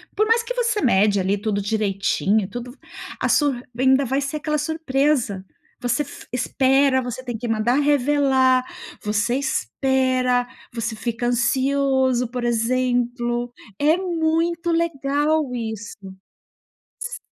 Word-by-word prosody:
Por 430 Hz, +2 st, +2 dB
mais 460 Hz, +1 st, +3 dB
que -, -, -4 dB
você 470 Hz, -4 st, 0 dB
mede 205 Hz, -5 st, +3 dB
ali 195 Hz, +2 st, 0 dB
tudo 205 Hz, -1 st, -1 dB
direitinho, 200 Hz, -1 st, 0 dB
tudo 245 Hz, +3 st, -7 dB
v 265 Hz, -, -19 dB, 0.4 s
a -, -, 0 dB
sur 280 Hz, -5 st, +2 dB, 0.2 s
ainda 265 Hz, +2 st, +4 dB
vai 265 Hz, +2 st, 0 dB
ser 280 Hz, +2 st, -3 dB
aquela 300 Hz, 0 st, -1 dB
surpresa. 285 Hz, -, 0 dB, 0.4 s
Você 245 Hz, +3 st, 0 dB
f 285 Hz, -, -12 dB
espera. 260 Hz, +1 st, +2 dB
Você 250 Hz, +1 st, -6 dB
tem 240 Hz, -3 st, -4 dB
que 240 Hz, -, -5 dB
mandar 225 Hz, +2 st, +1 dB
revelar. 270 Hz, -2 st, +3 dB, 0.4 s
Você 210 Hz, +3 st, 0 dB
espera. 260 Hz, -2 st, +1 dB, 0.3 s
Você 230 Hz, -1 st, -3 dB
fica 235 Hz, +1 st, -2 dB
ansioso, 260 Hz, +1 st, +1 dB
por 250 Hz, 0 st, -4 dB
exemplo. 240 Hz, 0 st, 0 dB, 0.3 s
É 305 Hz, +3 st, +4 dB
muito 335 Hz, -1 st, 0 dB
legal 300 Hz, -2 st, 0 dB
isso. 220 Hz, -2 st, -5 dB, 1.0 s
S 480 Hz, 0 st, -5 dB
255 Hz, 130 wpm, -22 LUFS, 235-290 Hz, 1.0 s, ainda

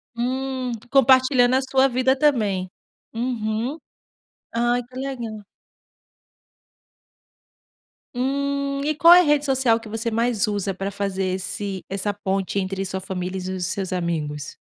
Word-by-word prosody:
Hum. 255 Hz, +1 st, -2 dB, 0.2 s
Compartilhando 260 Hz, -1 st, +5 dB
a 265 Hz, -, +3 dB
sua 265 Hz, 0 st, +3 dB
vida 260 Hz, +1 st, +2 dB
também. 210 Hz, -11 st, +1 dB, 0.4 s
Uhum. 230 Hz, +2 st, -2 dB, 0.8 s
Ai 240 Hz, +1 st, +1 dB
que 250 Hz, +2 st, -19 dB
legal. 235 Hz, -6 st, -5 dB, 2.7 s
Hum. 280 Hz, +2 st, -1 dB
E 310 Hz, -, 0 dB
qual 335 Hz, +3 st, +8 dB
é 355 Hz, -, +9 dB
a -, -, +5 dB
rede 295 Hz, -2 st, +2 dB
social 260 Hz, -4 st, +2 dB
que 225 Hz, -, -11 dB
você 225 Hz, +2 st, -2 dB
mais 230 Hz, -1 st, +1 dB
usa 200 Hz, -2 st, -1 dB
para 195 Hz, +2 st, -4 dB
fazer 195 Hz, -1 st, -2 dB
esse 195 Hz, 0 st, -4 dB
essa 200 Hz, +1 st, -2 dB
ponte 195 Hz, -1 st, -2 dB
entre 195 Hz, 0 st, -2 dB
sua 190 Hz, 0 st, -3 dB
família 185 Hz, 0 st, -4 dB
e -, -, -3 dB
os 180 Hz, -1 st, -2 dB
seus 185 Hz, +1 st, -3 dB
amigos. 155 Hz, -5 st, -3 dB
230 Hz, 135 wpm, -23 LUFS, 195-265 Hz, 2.7 s, é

